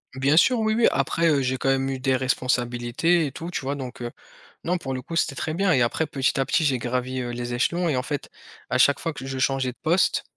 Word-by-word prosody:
Bien 135 Hz, +3 st, +2 dB
sûr 245 Hz, +8 st, +5 dB
oui, 220 Hz, 0 st, +1 dB
oui 230 Hz, 0 st, +4 dB
après, 165 Hz, 0 st, +1 dB
heu, 140 Hz, -3 st, +3 dB
j'ai 130 Hz, 0 st, 0 dB
quand 135 Hz, -, -1 dB
même 135 Hz, 0 st, +1 dB
eu 135 Hz, -, -2 dB
des 130 Hz, 0 st, +1 dB
responsabilités 125 Hz, +5 st, +1 dB
et 135 Hz, -, -6 dB
tout 165 Hz, +5 st, -7 dB
tu 175 Hz, -, -3 dB
vois? 135 Hz, +2 st, -2 dB
Donc 130 Hz, -2 st, -7 dB
heu 120 Hz, 0 st, -4 dB, 0.5 s
non 180 Hz, +2 st, +1 dB
pour 135 Hz, -6 st, -5 dB
le 130 Hz, -, -4 dB
coup 165 Hz, -, -7 dB
c'était 140 Hz, -4 st, +1 dB
très 155 Hz, -, -3 dB
bien 190 Hz, +3 st, +1 dB
et 130 Hz, -6 st, +3 dB
après 120 Hz, +7 st, +1 dB
petit 135 Hz, -2 st, -1 dB
à 135 Hz, -, +1 dB
petit 160 Hz, -, +1 dB
j'ai 130 Hz, -4 st, +1 dB
gravi, 125 Hz, +2 st, -2 dB
heu, 120 Hz, -, -4 dB
les 120 Hz, 0 st, -4 dB
échelons 170 Hz, +8 st, 0 dB
et 150 Hz, -, +1 dB
en 125 Hz, -, -1 dB
fait 145 Hz, 0 st, -4 dB, 0.4 s
à 125 Hz, -, +1 dB
chaque 140 Hz, +2 st, +4 dB
fois 165 Hz, -1 st, -3 dB
que 130 Hz, -, -8 dB
je 135 Hz, 0 st, -4 dB
changeais 135 Hz, -1 st, +1 dB
de 125 Hz, -, -20 dB
poste 170 Hz, +4 st, +2 dB
135 Hz, 265 wpm, -24 LUFS, 125-160 Hz, 0.5 s, sûr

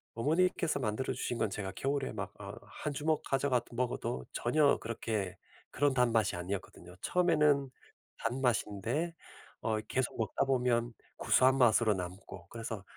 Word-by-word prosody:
어머니께서 160 Hz, +4 st, +2 dB
만들어 120 Hz, +2 st, -1 dB
주신 120 Hz, -, -3 dB
건 110 Hz, -2 st, +1 dB
제가 95 Hz, -1 st, -4 dB
겨울에 135 Hz, +5 st, -1 dB
막 -, -, -5 dB
어 -, -, -7 dB, 0.3 s
1 150 Hz, -, -1 dB
주먹 155 Hz, +2 st, 0 dB
가져가 135 Hz, -2 st, +2 dB
먹어도 120 Hz, -, -2 dB
전혀 145 Hz, +4 st, +3 dB
그렇게 110 Hz, -5 st, -3 dB, 0.3 s
그런 145 Hz, 0 st, +2 dB
단 125 Hz, -2 st, +3 dB
맛이 110 Hz, -5 st, +2 dB
아니었거든요. 90 Hz, -1 st, -6 dB
처음에는 150 Hz, -6 st, +3 dB, 0.5 s
단맛인데 120 Hz, -, 0 dB, 0.5 s
어 110 Hz, -1 st, 0 dB
계속 125 Hz, +4 st, -2 dB
먹다 115 Hz, +4 st, 0 dB
보면 120 Hz, -3 st, +1 dB, 0.2 s
구수한 130 Hz, +1 st, +4 dB
맛으로 115 Hz, -3 st, +5 dB
남고 90 Hz, +2 st, -7 dB
그래서 115 Hz, -3 st, -5 dB
120 Hz, 315 characters per minute, -32 LUFS, 110-140 Hz, 0.5 s, 맛으로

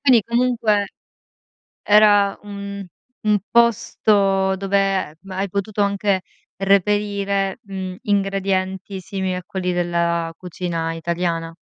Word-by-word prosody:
Quindi 255 Hz, -5 st, +5 dB
comunque 235 Hz, -3 st, +1 dB, 1.0 s
era 205 Hz, -1 st, +5 dB
un 200 Hz, -1 st, -7 dB, 0.4 s
un 210 Hz, -1 st, +3 dB
posto 200 Hz, -4 st, +3 dB
dove, 195 Hz, +1 st, -2 dB, 0.3 s
ehm, 170 Hz, +6 st, -17 dB
hai 190 Hz, +2 st, -2 dB
potuto 200 Hz, +2 st, -2 dB
anche 200 Hz, -1 st, +1 dB, 0.3 s
reperire, 200 Hz, 0 st, +1 dB
mhmm, 190 Hz, -2 st, -6 dB
ingredienti 195 Hz, -1 st, -1 dB
simili 190 Hz, 0 st, -3 dB
a 180 Hz, -, -5 dB
quelli 180 Hz, -1 st, -2 dB
della 170 Hz, -1 st, 0 dB
cucina 170 Hz, -2 st, -3 dB
italiana. 165 Hz, 0 st, -2 dB
195 Hz, 105 wpm, -21 LUFS, 185-205 Hz, 1.0 s, Quindi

